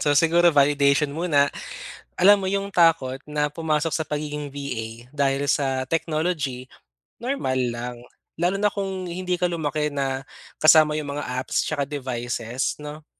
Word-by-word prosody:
so 145 -1 +2
siguro 170 +3 +5
by 140 +1 +6
audition 140 0 +2
muna, 150 -3 +2 0.6
alam 205 +3 +6
mo 195 - -4
'yong 200 +1 -1
takot 165 -8 +3
na 150 0 -1
pumasok 155 +1 -1
sa 160 0 -2
pagiging 150 -1 -4
VA 120 -4 -6
dahil 140 0 0
sa 135 -2 +1
technology, 155 -6 -1 0.5
normal 235 - -1
lang. 120 +1 -5 0.4
Lalo 180 +3 +2
na 205 +1 +2
kung 190 -2 -3
hindi 180 +1 -2
ka 180 - 0
lumaki 155 -3 -1
na 135 -1 -2 0.3
kasama 155 0 +6
'yong 145 -2 -4
mga 145 - -3
apps, 130 - 0
'tsaka 145 -2 -1
devices, 125 -3 -3
'no, 150 +1 -8
150 Hz, 150 wpm, -24 LUFS, 135-165 Hz, 0.6 s, by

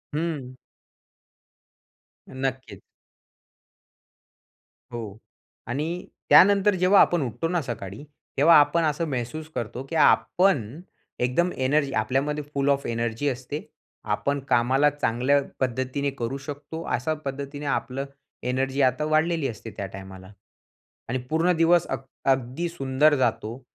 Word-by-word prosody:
हं. 150 -6 -3 1.7
नक्कीच. 130 -6 -4 2.1
हो 120 -1 -4 0.6
आणि 135 +6 -2 0.4
त्यानंतर, 200 +1 +6
जेव्हा 185 +2 +5
आपण 175 -2 +3
उठतो 130 +5 -2
ना 175 0 0
सकाळी, 110 -3 -6 0.3
तेव्हा 165 +4 +7
आपण 165 +3 +3
असं 155 +2 0
महसूस 135 +5 -4
करतो, 120 +3 -4
की 135 +4 -7
आपण 160 - +3 0.4
एकदम 150 +9 +1
एनर्जी 135 +2 +1
आपल्यामध्ये 140 +7 0
फुल 140 0 +1
ऑफ 140 0 +1
एनर्जी 115 +3 -2
असते. 135 +4 -5 0.4
आपण 140 +7 -1
कामाला 130 +5 +4
चांगल्या 140 0 +1 0.2
पद्धतीने 130 +2 -1
करू 120 +3 -2
शकतो, 145 +3 -7
अशा 125 +3 -1
पद्धतीने 140 +1 -5
आपलं 135 -1 -2 0.5
एनर्जी 135 +2 0
आता 130 +3 +2
वाढलेली 155 0 +1
असते 115 -2 -7
त्या 100 - -3
टायमाला 95 0 -11 0.8
आणि 125 - 0
पूर्ण 165 +3 +2
दिवस 165 +1 +4
अग 135 - -2 0.3
अगदी 130 +6 -1
सुंदर 145 -1 +2
जातो. 115 -1 -1
135 Hz, 115 wpm, -25 LUFS, 125-155 Hz, 2.1 s, तेव्हा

